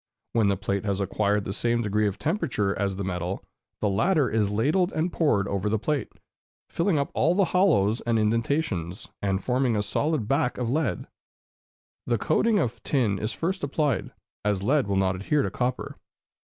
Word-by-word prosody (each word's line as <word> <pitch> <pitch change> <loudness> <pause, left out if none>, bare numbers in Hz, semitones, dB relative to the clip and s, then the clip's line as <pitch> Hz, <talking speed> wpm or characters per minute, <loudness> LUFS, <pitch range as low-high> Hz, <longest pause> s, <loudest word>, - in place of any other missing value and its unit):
When 115 -3 +3
the 100 -1 +2
plate 100 0 -2
has 100 -2 -1
acquired 100 +1 0
the 95 - -3
same 120 +2 0
degree 105 0 +1
of 100 0 -3
temperature 105 - -1
as 100 -1 -1
the 100 - -4
metal, 90 0 -3 0.4
the 105 - +2
latter 150 - +2
is 110 -2 +1
ladled 150 - +1
and 165 +3 -1
poured 110 - +2
over 100 +1 -1
the 110 - +1
plate, 145 +5 -2 0.6
filling 170 -1 +1
up 140 +4 -1
all 170 +3 +2
the 195 0 +4
hollows 135 - +3
and 115 -1 +2
indentations, 110 - -1
and 95 -1 -1
forming 125 -2 +1
a 105 - 0
solid 145 0 -1
back 135 -1 +1
of 120 -2 -1
lead. 155 +4 -1 1.0
The - - +2
coating 225 -2 +2
of 120 - -1
tin 115 -8 0
is 110 +2 -2
first 185 +2 -3
applied, 145 -1 0 0.3
as 100 -2 0
lead 135 +1 +2
will 100 - 0
not 95 -1 +2
adhere 140 +9 +1
to - - -2
copper. 125 0 -3
115 Hz, 180 wpm, -26 LUFS, 100-150 Hz, 1.0 s, the